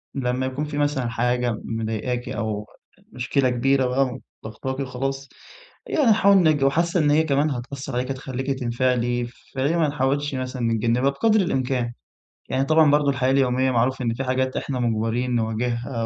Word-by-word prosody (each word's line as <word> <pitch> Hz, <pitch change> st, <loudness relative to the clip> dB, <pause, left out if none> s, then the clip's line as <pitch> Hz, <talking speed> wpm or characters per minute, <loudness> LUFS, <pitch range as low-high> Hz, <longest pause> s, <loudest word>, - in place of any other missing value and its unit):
لمّا 130 Hz, -1 st, -1 dB
يكون 130 Hz, +3 st, -3 dB
في 150 Hz, -1 st, -5 dB
مثلًا 145 Hz, -4 st, 0 dB
حاجة 120 Hz, 0 st, 0 dB
مضايقاكِ 115 Hz, +2 st, -3 dB
أو 110 Hz, -2 st, -3 dB, 0.5 s
مشكلة 130 Hz, +1 st, 0 dB
كبيرة 135 Hz, +2 st, +2 dB
بقى 130 Hz, 0 st, 0 dB, 0.2 s
وضغطاكِ 130 Hz, +5 st, -5 dB
وخلاص، 135 Hz, +1 st, -3 dB, 0.6 s
يعني 300 Hz, -, +1 dB
نحاول 200 Hz, -2 st, +5 dB
نج 155 Hz, -5 st, +3 dB
وحاسة 170 Hz, +6 st, +2 dB
إن 145 Hz, -1 st, +3 dB
هي 155 Hz, +2 st, +4 dB
كمان 150 Hz, 0 st, +1 dB
هتأثر 135 Hz, +2 st, -6 dB
عليكِ 125 Hz, +2 st, -1 dB
هتخلّيكِ 135 Hz, 0 st, -4 dB
تنفعلي 120 Hz, 0 st, 0 dB, 0.3 s
فليه 140 Hz, +5 st, 0 dB
ما 160 Hz, -3 st, +3 dB
نحاولش 140 Hz, 0 st, -1 dB
مثلًا 130 Hz, -1 st, -4 dB
نتجنبها 115 Hz, +3 st, +1 dB
بقدر 220 Hz, +10 st, +2 dB
الإمكان، 130 Hz, -7 st, -1 dB, 0.6 s
يعني 130 Hz, +1 st, +1 dB
طبعًا 155 Hz, 0 st, +5 dB
برضه 145 Hz, -1 st, +3 dB
الحياة 130 Hz, -1 st, +1 dB
اليومية 130 Hz, -1 st, +2 dB
معروف 125 Hz, +2 st, +1 dB
إن 115 Hz, -2 st, 0 dB
في 130 Hz, -, -3 dB
حاجات 130 Hz, 0 st, -1 dB
إحنا 130 Hz, -2 st, -3 dB
مجبرين 120 Hz, +1 st, 0 dB
نواجهها 115 Hz, +1 st, -2 dB
130 Hz, 155 wpm, -23 LUFS, 120-140 Hz, 0.6 s, نحاول